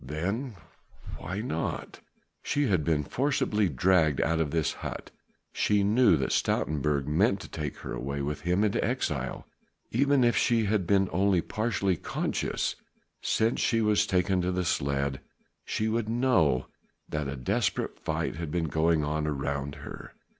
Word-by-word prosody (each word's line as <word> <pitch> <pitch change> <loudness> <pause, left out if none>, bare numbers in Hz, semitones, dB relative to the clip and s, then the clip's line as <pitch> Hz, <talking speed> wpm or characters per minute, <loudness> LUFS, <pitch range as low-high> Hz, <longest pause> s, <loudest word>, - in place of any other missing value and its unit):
"Then 100 - -3 0.6
why 95 +6 -4
not?" 80 -8 -4 0.4
She 145 0 0
had 90 -6 +2
been 75 -1 +1
forcibly 110 - +1
dragged 80 0 +3
out 80 0 +1
of 80 -3 +1
this 80 0 0
hut: - - -6 0.4
she 105 -1 +2
knew 105 -3 +5
that 65 -2 -1
Stoutenburg 75 -2 0
meant 95 - +2
to - - -8
take 75 -3 -5
her - - -4
away 70 +2 -3
with 75 +1 -3
him 90 +4 +1
into 105 -2 +1
exile; 75 - -2 0.5
even 140 +2 +3
if 120 0 +3
she 115 -2 +3
had 100 -3 0
been 95 0 +3
only 95 +1 +3
partially 100 -2 0
conscious - - -2 0.5
since 115 +2 +1
she 115 - +2
was 105 -1 +3
taken 90 -1 +2
to 90 +1 0
the 90 0 -1
sledge, 70 -2 0 0.5
she 110 - -1
would 110 0 -1
know 115 - +2 0.4
that 75 -2 -3
a 70 - -4
desperate 65 -2 -1
fight - - -2
had 80 -2 -4
been 80 0 -1
going 80 +1 +2
on 75 +1 -1
around 70 0 -2
her. - - -9
90 Hz, 155 wpm, -28 LUFS, 75-105 Hz, 0.6 s, knew